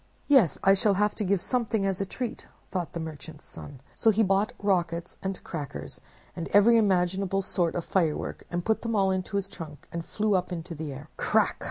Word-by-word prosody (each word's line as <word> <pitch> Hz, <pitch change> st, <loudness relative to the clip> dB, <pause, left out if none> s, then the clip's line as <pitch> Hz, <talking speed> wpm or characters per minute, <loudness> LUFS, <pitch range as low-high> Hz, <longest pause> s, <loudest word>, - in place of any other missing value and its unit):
"Yes, 265 Hz, -, +5 dB
I 195 Hz, -, +7 dB
shall 200 Hz, 0 st, +3 dB
have 210 Hz, +2 st, +2 dB
to 215 Hz, -, -3 dB
give 200 Hz, 0 st, +2 dB
something 225 Hz, 0 st, 0 dB
as 195 Hz, -1 st, 0 dB
a 195 Hz, -, -2 dB
treat," 245 Hz, +3 st, -5 dB, 0.2 s
thought 180 Hz, -3 st, -3 dB
the 170 Hz, -, -3 dB
Merchant's 155 Hz, -1 st, -7 dB
Son. 140 Hz, -3 st, -10 dB
So 225 Hz, -, +3 dB
he 220 Hz, +1 st, +4 dB
bought 195 Hz, +4 st, +2 dB
rockets 175 Hz, -4 st, -1 dB
and 190 Hz, -1 st, -3 dB
crackers, 145 Hz, -, -6 dB, 0.3 s
and 170 Hz, -, -4 dB
every 210 Hz, +3 st, +6 dB
imaginable 195 Hz, -1 st, +2 dB
sort 175 Hz, -3 st, 0 dB
of 175 Hz, -, -2 dB
fire 165 Hz, -5 st, +1 dB
work, -, -, -6 dB, 0.2 s
put 220 Hz, +2 st, +1 dB
them 230 Hz, -1 st, -2 dB
all 195 Hz, -2 st, +3 dB
into 190 Hz, +2 st, -2 dB
his 200 Hz, -1 st, 0 dB
trunk, 155 Hz, -7 st, -10 dB
and 170 Hz, 0 st, -4 dB
flew 210 Hz, +4 st, 0 dB
up 185 Hz, -1 st, +1 dB
into 170 Hz, 0 st, -5 dB
the 155 Hz, -2 st, -5 dB
air. 145 Hz, +3 st, -9 dB
"Crack!" -, -, +2 dB
190 Hz, 205 wpm, -27 LUFS, 170-205 Hz, 0.3 s, I